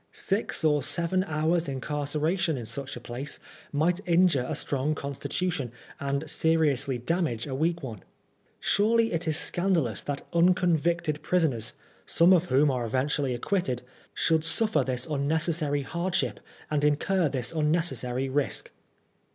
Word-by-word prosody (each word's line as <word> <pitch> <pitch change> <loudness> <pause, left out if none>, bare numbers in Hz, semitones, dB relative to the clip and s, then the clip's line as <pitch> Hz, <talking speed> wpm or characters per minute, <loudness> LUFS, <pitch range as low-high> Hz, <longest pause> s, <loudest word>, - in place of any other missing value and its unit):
Six 200 -3 -1
or 150 -2 +3
seven 170 +6 0
hours' 160 0 0
incarceration 150 +5 -1
in 120 - -5
such 130 +4 -5
a - - -6
place 120 +4 -5 0.3
might 165 +5 +1
injure 170 -7 +3
a - - -1
strong 145 +2 -1
constitution 140 0 -3 0.3
and 140 +2 -2
seriously 145 -5 +1
damage 125 -3 -1
a 135 - -5
weak 165 +4 0
one. 110 -7 -6 0.6
Surely 225 +1 +2
it 165 +1 -2
is 155 -2 +3
scandalous 170 - +2
that 145 -1 -4
unconvicted 170 -2 +2
prisoners, 130 -11 0 0.3
some 170 +3 +5
of 180 -1 +4
whom 145 -2 +3
are 125 -2 -1
eventually 130 +2 0
acquitted, 125 -3 -1 0.3
should 160 -1 +1
suffer 165 -3 +2
this 125 -1 -2
unnecessary 150 0 0
hardship 170 +5 -1 0.3
and 150 -1 +1
incur 155 +3 +2
this 125 -3 -2
unnecessary 150 -5 0
risk. 140 +1 -1
150 Hz, 135 wpm, -27 LUFS, 135-170 Hz, 0.6 s, some